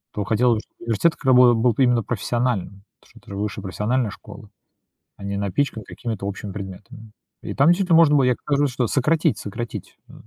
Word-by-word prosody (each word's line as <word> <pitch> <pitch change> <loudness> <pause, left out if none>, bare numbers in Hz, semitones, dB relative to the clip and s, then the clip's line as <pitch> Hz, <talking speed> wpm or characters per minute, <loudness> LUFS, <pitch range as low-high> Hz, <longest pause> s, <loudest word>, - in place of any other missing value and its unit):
То 105 - -1
хотелось 115 +2 +2
бы, - - -2
чтобы - - -18
университет 115 +9 +1
к - - -16
рабо 125 -2 +6
был 115 +1 +2
б 135 - +2
именно 120 -2 +2
профессиональным. 120 -4 -2 0.2
Это - - -22
это - - -15
ж - - -6
высшая 100 0 -4
профессиональная 105 +4 -1
школа. 105 0 -12 0.7
А 100 - -11
не 100 0 -3
напичканы 110 +4 -2
какими-то 110 -5 -6
общими 100 +1 -5
предметами. 105 +4 -9 0.3
И - - -6
там 140 +3 +4
действительно 175 -1 +4
можно 155 -3 +6
было, 135 - +4
я 125 -1 +3
как - - -13
раз 140 - +3
говорю, 145 -3 +1
что 125 -1 0
сократить 155 +5 +1
сократить. 115 0 -7
Э, - - -16
120 Hz, 210 wpm, -22 LUFS, 105-130 Hz, 0.7 s, рабо